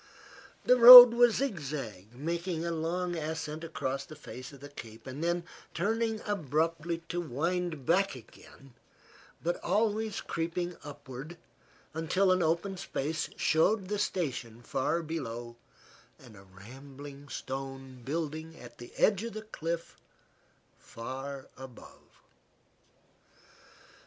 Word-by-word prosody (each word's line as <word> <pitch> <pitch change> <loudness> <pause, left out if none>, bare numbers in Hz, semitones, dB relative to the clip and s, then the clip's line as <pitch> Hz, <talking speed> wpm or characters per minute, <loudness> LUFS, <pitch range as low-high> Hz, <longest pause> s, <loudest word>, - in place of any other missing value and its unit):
The 250 - +5
road 245 0 +13
was 240 -1 +4
zigzag, 140 - -4
making 170 +4 -3
a 170 - -1
long 175 +2 -2
ascent 160 0 -4
across 140 -4 -3
the 155 - -12
face 130 -2 -10
of 140 - -14
the 145 - -10
cape, 115 -5 -11
then 170 +6 -2 0.3
turning 220 +4 -1
abruptly 165 -2 -1
to 175 0 -2
wind 165 0 -2
back 190 +2 +2
again, 130 +2 -16 0.7
but 175 +1 -2
always 215 +2 0
creeping 175 +1 -3
upward 145 +2 -9 0.6
until 185 +4 +1
an 185 0 +2
open 170 +4 0
space 155 -2 -3
showed 185 +5 +2
the 210 -1 -1
station 125 - -3
far 165 +8 -1
below 120 -7 -5 0.6
and 120 -5 -16
a 95 0 -15
rambling 135 +8 -12
stone 135 0 -7
building 160 +2 -4
at 120 -1 -13
the 120 - -10
edge 205 -1 +3
of 230 - -5
the 215 0 -6
cliff 170 -5 -5 0.8
far 135 +3 -7
above. 130 -2 -14
160 Hz, 115 wpm, -30 LUFS, 135-180 Hz, 0.8 s, road